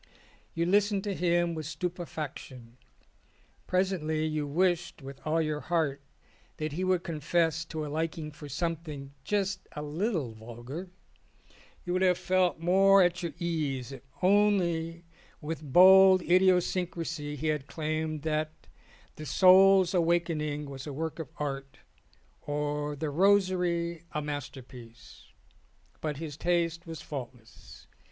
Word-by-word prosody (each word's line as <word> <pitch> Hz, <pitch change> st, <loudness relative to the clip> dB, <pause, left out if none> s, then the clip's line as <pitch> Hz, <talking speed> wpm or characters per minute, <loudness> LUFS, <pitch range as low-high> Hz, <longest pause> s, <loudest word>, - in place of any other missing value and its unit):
You 170 Hz, 0 st, 0 dB
listened 200 Hz, +1 st, +2 dB
to 205 Hz, -, -2 dB
him 175 Hz, -1 st, +1 dB
with 155 Hz, -2 st, -5 dB
stupefaction. 150 Hz, -7 st, -6 dB, 0.9 s
Presently 175 Hz, -5 st, 0 dB
you 155 Hz, -2 st, -2 dB
wished 175 Hz, 0 st, 0 dB
with 135 Hz, 0 st, -9 dB
all 160 Hz, +2 st, +2 dB
your 155 Hz, -2 st, -1 dB
heart 155 Hz, -4 st, -1 dB, 0.6 s
that 155 Hz, 0 st, -3 dB
he 175 Hz, +6 st, -3 dB
would 185 Hz, -1 st, +1 dB
confess 165 Hz, 0 st, 0 dB
to 155 Hz, -1 st, -5 dB
a -, -, -5 dB
liking 155 Hz, +1 st, -3 dB
for 150 Hz, 0 st, -11 dB
something 150 Hz, -3 st, -4 dB
just 195 Hz, -2 st, -1 dB
a 150 Hz, -, -4 dB
little 155 Hz, -, -2 dB
vulgar: 120 Hz, +10 st, -8 dB, 1.0 s
you 175 Hz, -, -2 dB
would 185 Hz, -, 0 dB
have 180 Hz, -2 st, +4 dB
felt 185 Hz, -3 st, +1 dB
more 190 Hz, +3 st, +5 dB
at 175 Hz, +1 st, +1 dB
your 170 Hz, -2 st, -4 dB
ease 150 Hz, -7 st, -2 dB
if 135 Hz, -, -9 dB, 0.2 s
only 175 Hz, -4 st, +2 dB, 0.4 s
with 160 Hz, +1 st, -5 dB
bold 190 Hz, +2 st, +8 dB
idiosyn 180 Hz, 0 st, +3 dB
crasy 155 Hz, -4 st, -5 dB
he 155 Hz, +2 st, -2 dB
had 150 Hz, -3 st, -2 dB
claimed 155 Hz, -1 st, -3 dB
that 155 Hz, 0 st, -3 dB, 0.5 s
The 155 Hz, -, -7 dB
Soul's 190 Hz, +3 st, +6 dB
Awakening 165 Hz, -4 st, 0 dB
"was 135 Hz, +1 st, -8 dB
a 145 Hz, -, -5 dB
work 160 Hz, +3 st, -4 dB
of 155 Hz, -5 st, -6 dB
art 135 Hz, -2 st, -5 dB, 0.6 s
or 150 Hz, 0 st, -2 dB
The 150 Hz, +1 st, -3 dB
Rosary 180 Hz, -2 st, +2 dB
a 150 Hz, -, -1 dB
masterpiece. 125 Hz, -5 st, -8 dB, 0.7 s
But 150 Hz, -2 st, -3 dB
his 150 Hz, -2 st, -6 dB
taste 170 Hz, -1 st, 0 dB
was 165 Hz, -1 st, -7 dB
faultless. 125 Hz, -5 st, -10 dB
160 Hz, 130 wpm, -29 LUFS, 150-180 Hz, 1.0 s, bold